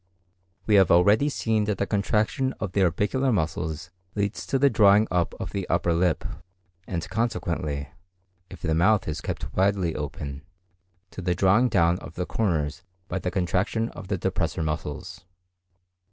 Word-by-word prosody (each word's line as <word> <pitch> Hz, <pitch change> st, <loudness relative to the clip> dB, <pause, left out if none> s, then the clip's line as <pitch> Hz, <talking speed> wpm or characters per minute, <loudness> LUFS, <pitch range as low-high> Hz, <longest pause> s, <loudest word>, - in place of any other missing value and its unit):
We 110 Hz, -, +1 dB
have 95 Hz, -, +2 dB
already 100 Hz, +11 st, +5 dB
seen 110 Hz, -6 st, 0 dB
that 105 Hz, -2 st, -1 dB
the 100 Hz, -, 0 dB
contraction 110 Hz, +6 st, 0 dB
of 100 Hz, -, -5 dB
the 100 Hz, -, +1 dB
orbicular 105 Hz, +9 st, +1 dB
muscles 80 Hz, -5 st, -2 dB, 0.2 s
leads 100 Hz, 0 st, -2 dB
to 135 Hz, -, +1 dB
the 140 Hz, +2 st, +4 dB
drawing 105 Hz, -3 st, +5 dB
up 90 Hz, -2 st, 0 dB
of -, -, -5 dB
the 100 Hz, -2 st, -4 dB
upper 85 Hz, 0 st, +2 dB
lip, 85 Hz, 0 st, +1 dB, 0.6 s
and 85 Hz, -3 st, -3 dB
consequently, 85 Hz, -10 st, -2 dB, 0.6 s
if 90 Hz, -, -12 dB
the 80 Hz, -, +1 dB
mouth 100 Hz, +6 st, +3 dB
is 80 Hz, -, -3 dB
kept -, -, -5 dB
widely 95 Hz, -3 st, +1 dB
open, 70 Hz, -1 st, -5 dB, 0.7 s
to -, -, -7 dB
the 90 Hz, -1 st, 0 dB
drawing 100 Hz, +8 st, +4 dB
down 85 Hz, -2 st, +3 dB
of 80 Hz, -, -11 dB
the 90 Hz, -, -2 dB
corners 85 Hz, -7 st, -1 dB, 0.3 s
by 95 Hz, -, -2 dB
the 90 Hz, -, -2 dB
contraction 95 Hz, +5 st, 0 dB
of -, -, -10 dB
the -, -, -1 dB
depressor 80 Hz, -, -1 dB
muscles. 80 Hz, +5 st, -4 dB
95 Hz, 160 wpm, -25 LUFS, 85-105 Hz, 0.7 s, already